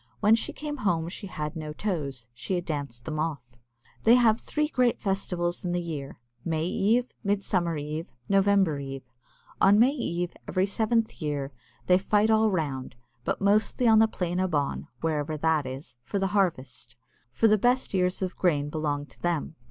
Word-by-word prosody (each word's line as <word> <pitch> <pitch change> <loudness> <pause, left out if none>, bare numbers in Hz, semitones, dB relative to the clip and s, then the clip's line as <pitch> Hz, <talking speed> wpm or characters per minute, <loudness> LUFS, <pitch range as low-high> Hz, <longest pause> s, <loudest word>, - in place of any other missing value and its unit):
When 210 +1 +5
she 225 - +1
came 295 -1 -5
home 170 -8 0
she 195 +3 -7
had 150 -3 -5
no 155 -2 -5
toes 145 - -3
she 125 +10 -3
had 175 -1 -2
danced 140 -6 -4
them 155 -1 -3
off. 155 -5 -2 0.6
They 230 +2 +6
have 230 -2 +4
three 300 0 -1
great 250 -5 +1
festivals 180 -3 -1
in 175 -1 -1
the 175 - +1
year 155 -5 -6 0.2
May 160 -1 -1
Eve, 225 +7 +1
Midsummer 190 -5 0
Eve, 150 +3 -5 0.2
November 195 -6 +3
Eve. 135 -2 -8 0.5
On 200 +2 +6
May 240 +5 +6
Eve, 175 - -2
every 185 +1 +1
seventh 225 +2 0
year, 145 -2 -2 0.3
they 180 0 +5
fight 210 +2 +2
all 220 0 +4
round, 140 - -2 0.3
but - - -2
mostly 215 +4 +2
on 220 -1 +7
the 220 - +6
"Plain 180 -4 -2
a 185 - +2
Bawn" 145 -5 -1
(wherever 155 -1 -1
that 155 -2 +1
is), 130 -1 -8
for 200 - -3
the 195 -1 -1
harvest, 135 - -1 0.4
for 125 - +3
the 215 -1 +4
best 245 +2 +2
ears 180 0 +1
of 185 - -3
grain 150 -5 +1
belong 145 -2 -2
to - - -20
them. 170 -2 -1
175 Hz, 180 wpm, -27 LUFS, 150-205 Hz, 0.6 s, on